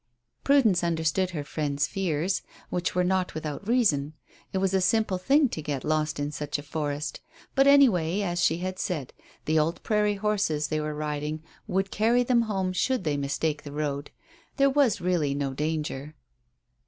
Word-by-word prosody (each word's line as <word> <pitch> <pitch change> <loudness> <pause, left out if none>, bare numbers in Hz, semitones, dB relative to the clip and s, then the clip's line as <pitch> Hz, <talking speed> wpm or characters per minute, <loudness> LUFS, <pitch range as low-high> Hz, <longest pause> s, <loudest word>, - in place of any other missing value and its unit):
Prudence 230 -11 +4
understood 170 +2 +1
her 155 -5 -4
friend's 145 -2 -1
fears, 180 +1 -1 0.3
which 180 0 -1
were 180 - +3
not 185 -1 0
without 155 +4 -5
reason. 160 - +2 0.4
It - - -2
was 190 0 +1
a 190 - +3
simple 195 0 +2
thing 280 +9 +4
to 160 - -5
get 145 -3 -3
lost 155 -1 0
in 145 0 -2
such 150 0 -3
a 145 - -7
forest. 145 0 -3 0.3
But 270 0 +4
anyway, 210 - +5
as 175 -3 -1
she 165 -1 +3
had 185 +1 -4
said, 150 -8 -3 0.3
the 155 +1 +3
old 160 +3 -1
prairie 210 -1 +2
horses 195 -8 0
they 155 - 0
were 150 0 -3
riding 150 +1 -3 0.2
would 195 -1 0
carry 235 +4 +3
them 245 -1 +3
home 190 -2 -1
should 255 +4 0
they 150 -3 0
mistake 145 +2 -1
the 145 - -9
road. 145 -1 -3 0.5
There 275 0 +4
was 265 -7 +2
really 170 -6 +1
no 140 -1 -2
danger. 150 0 -3
170 Hz, 175 wpm, -27 LUFS, 150-195 Hz, 0.5 s, anyway